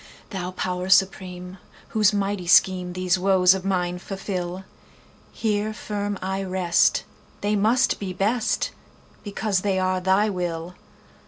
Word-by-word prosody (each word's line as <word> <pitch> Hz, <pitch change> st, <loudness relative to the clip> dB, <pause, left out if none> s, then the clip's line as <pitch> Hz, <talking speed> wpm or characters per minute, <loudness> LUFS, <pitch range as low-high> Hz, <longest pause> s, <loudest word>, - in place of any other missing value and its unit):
Thou 180 Hz, -3 st, -4 dB
Power 185 Hz, 0 st, -3 dB
Supreme, 185 Hz, -1 st, +1 dB, 0.3 s
whose 215 Hz, -3 st, +3 dB
mighty 200 Hz, -3 st, -2 dB
schemeThese 180 Hz, 0 st, +3 dB
woes 185 Hz, -1 st, +5 dB
of 190 Hz, -1 st, -4 dB
mine 180 Hz, -2 st, -1 dB
fulfil, 190 Hz, -1 st, -5 dB, 0.7 s
Here 215 Hz, -1 st, -1 dB
firm 205 Hz, -1 st, -3 dB
I 190 Hz, +1 st, -2 dB
rest; 185 Hz, -2 st, +2 dB, 0.4 s
they 205 Hz, +1 st, +1 dB
must 225 Hz, +5 st, +2 dB
be 195 Hz, -2 st, -4 dB
best, 215 Hz, +5 st, 0 dB, 0.5 s
Because 205 Hz, -1 st, -1 dB
they 195 Hz, -1 st, 0 dB
are 185 Hz, 0 st, 0 dB
Thy 190 Hz, +3 st, +3 dB
will! 175 Hz, -3 st, -3 dB
190 Hz, 120 wpm, -24 LUFS, 180-205 Hz, 0.7 s, woes